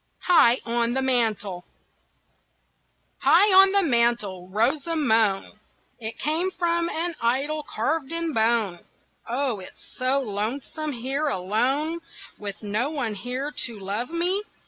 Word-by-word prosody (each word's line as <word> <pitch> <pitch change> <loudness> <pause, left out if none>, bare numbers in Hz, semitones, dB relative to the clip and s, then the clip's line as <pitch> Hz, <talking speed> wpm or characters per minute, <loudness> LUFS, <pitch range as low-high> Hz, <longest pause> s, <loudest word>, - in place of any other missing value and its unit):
HIGH 265 -9 +5
ON 235 +1 0
THE 265 - +1
MANTEL 215 -8 0 1.6
High 350 +9 +5
on 385 +1 +8
the 400 0 +3
mantel 235 - +1
rose 230 - +1
a 330 - -1
moan 220 -8 +1 0.4
It 225 -1 -5
came 320 +6 0
from 340 -2 0
an 340 +2 -2
idol 275 +6 0
carved 295 +3 -2
in 335 -1 -2
bone 220 -6 +1 0.5
"Oh, 250 -3 -1
it's 185 - -13
so 255 +2 +2
lonesome 260 +7 -4
here 270 +5 -2
alone, 265 - 0 0.4
With 205 0 -7
no 215 +6 0
one 275 -8 -2
near 260 +4 -3 0.2
to 230 -3 -10
love 205 +6 -3
me!" 350 +4 0
255 Hz, 130 wpm, -25 LUFS, 220-310 Hz, 1.6 s, on